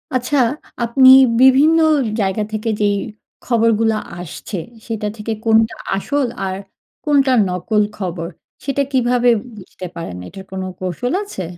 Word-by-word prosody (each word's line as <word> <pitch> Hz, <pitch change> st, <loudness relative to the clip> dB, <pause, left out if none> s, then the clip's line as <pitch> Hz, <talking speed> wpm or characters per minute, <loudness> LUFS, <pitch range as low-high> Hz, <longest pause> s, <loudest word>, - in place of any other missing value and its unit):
আচ্ছা, 255 Hz, +3 st, 0 dB, 0.5 s
আপনি 260 Hz, +3 st, +5 dB, 0.3 s
বিভিন্ন 280 Hz, +5 st, +6 dB, 0.4 s
জায়গা 195 Hz, +2 st, 0 dB
থেকে 215 Hz, +1 st, -2 dB
যেই 205 Hz, -1 st, +2 dB, 0.5 s
খবরগুলো 225 Hz, -2 st, +2 dB, 0.2 s
আসছে, 180 Hz, +3 st, -7 dB, 0.3 s
সেটা 220 Hz, -2 st, -3 dB
থেকে 215 Hz, +1 st, -5 dB
কোনটা 225 Hz, 0 st, +3 dB, 0.2 s
আসল, 275 Hz, +7 st, -1 dB, 0.2 s
আর 190 Hz, 0 st, -3 dB, 0.5 s
কোনটা 280 Hz, -3 st, +3 dB, 0.2 s
নকল 195 Hz, +4 st, 0 dB, 0.2 s
খবর, 175 Hz, -4 st, -4 dB, 0.4 s
সেটা 275 Hz, 0 st, 0 dB
কীভাবে 245 Hz, -2 st, +2 dB, 0.3 s
বুঝতে 185 Hz, -1 st, -10 dB
পারেন? 165 Hz, -, -6 dB
এটার 190 Hz, +1 st, -11 dB
কোনো 190 Hz, 0 st, -4 dB
কৌশল 185 Hz, -, -3 dB
আছে? 395 Hz, -, -6 dB
225 Hz, 125 wpm, -18 LUFS, 190-255 Hz, 0.5 s, বিভিন্ন